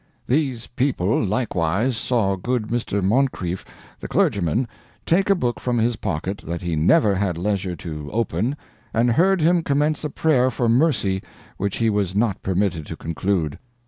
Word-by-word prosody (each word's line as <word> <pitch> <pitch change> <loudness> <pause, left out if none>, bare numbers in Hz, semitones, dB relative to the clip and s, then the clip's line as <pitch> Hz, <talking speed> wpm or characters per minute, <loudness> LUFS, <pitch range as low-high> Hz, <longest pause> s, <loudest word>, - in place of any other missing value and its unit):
These 130 -4 0
people 120 -6 0
likewise 100 +1 0
saw 110 -4 +1
good 120 +3 -2
Mr. 110 -4 -1
Moncrieff, 95 -5 0 0.4
the - - -6
clergyman, 100 +7 +1 0.4
take 190 +4 +2
a 195 - +6
book 125 -9 -1
from 125 -1 -1
his 115 +1 +2
pocket 95 +2 -3
that 85 +1 -4
he 85 -2 -1
never 100 - +4
had 95 -3 -1
leisure 95 -1 -1
to 75 -3 -7
open, 115 - -1 0.4
and 120 +2 +3
heard 185 +7 +3
him 170 +2 +4
commence 150 0 0
a 150 - -1
prayer 135 -4 +2
for 120 -1 -1
mercy 115 - +2 0.4
which 100 0 -2
he 115 -1 +2
was 100 -3 -1
not 105 -3 +1
permitted 90 -4 -1
to - - -5
conclude. 85 -2 -2
110 Hz, 160 wpm, -22 LUFS, 95-130 Hz, 0.4 s, a